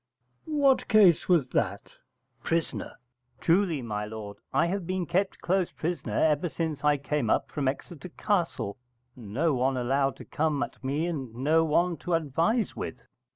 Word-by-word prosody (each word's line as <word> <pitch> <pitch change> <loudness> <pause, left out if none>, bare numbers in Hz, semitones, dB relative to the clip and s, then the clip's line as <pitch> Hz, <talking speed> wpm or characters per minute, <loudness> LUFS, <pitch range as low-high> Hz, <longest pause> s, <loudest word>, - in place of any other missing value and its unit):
_ - - -6
What 280 -3 +3
case 200 -9 +5
was 160 -8 +3
that? - - -2 0.5
Pris. 165 0 0 0.7
Truly, 170 -5 +2
my 105 -2 -3
lord, 105 -1 -7
I - - +3
have 180 0 -2
been 185 -1 -1
kept 190 +4 -1
close 185 0 +1
prisoner 170 +2 -3
ever 155 +2 +2
since 160 -3 -3
I 150 -1 +4
came 140 -4 -1
up - - +1
from 145 -3 -1
Exeter 145 +5 -4
Castle, 165 - -1 0.4
and 110 -5 -10
no 155 +7 +1
one 130 +1 +1
allowed 135 +2 +1
to - - -11
come 150 -2 0
at - - -9
me 145 +5 0
and 135 -9 -4
no 155 +6 +3
one 170 +2 +2
to 175 -2 -1
advise 165 - 0
with. - - -4
155 Hz, 165 wpm, -28 LUFS, 135-175 Hz, 0.7 s, case